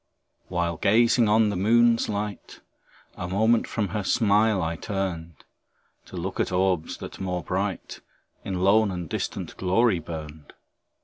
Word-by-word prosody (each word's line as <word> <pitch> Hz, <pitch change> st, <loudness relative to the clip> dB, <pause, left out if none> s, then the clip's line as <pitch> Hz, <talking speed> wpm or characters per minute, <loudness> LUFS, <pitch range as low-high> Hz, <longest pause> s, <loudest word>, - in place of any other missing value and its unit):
While 85 Hz, -2 st, -2 dB
gazing 115 Hz, +3 st, +3 dB
on 110 Hz, 0 st, +4 dB
the 100 Hz, -, -2 dB
moon's 115 Hz, +4 st, +3 dB
light, 105 Hz, -1 st, -5 dB, 0.6 s
A 90 Hz, -, -4 dB
moment 110 Hz, +5 st, +2 dB
from 105 Hz, -4 st, -2 dB
her 105 Hz, -2 st, -3 dB
smile 105 Hz, 0 st, +2 dB
I 85 Hz, -1 st, -2 dB
turned, 85 Hz, -4 st, -5 dB, 0.6 s
To -, -, -10 dB
look -, -, -4 dB
at -, -, 0 dB
orbs, 90 Hz, -3 st, 0 dB
that, -, -, -9 dB
more 90 Hz, -2 st, -3 dB
bright, 95 Hz, +1 st, -3 dB, 0.4 s
In 95 Hz, -2 st, -3 dB
lone 105 Hz, +3 st, +4 dB
and 90 Hz, -3 st, -5 dB
distant -, -, -4 dB
glory 95 Hz, +1 st, +2 dB
burned. 80 Hz, -2 st, -9 dB
95 Hz, 140 wpm, -25 LUFS, 90-110 Hz, 0.6 s, on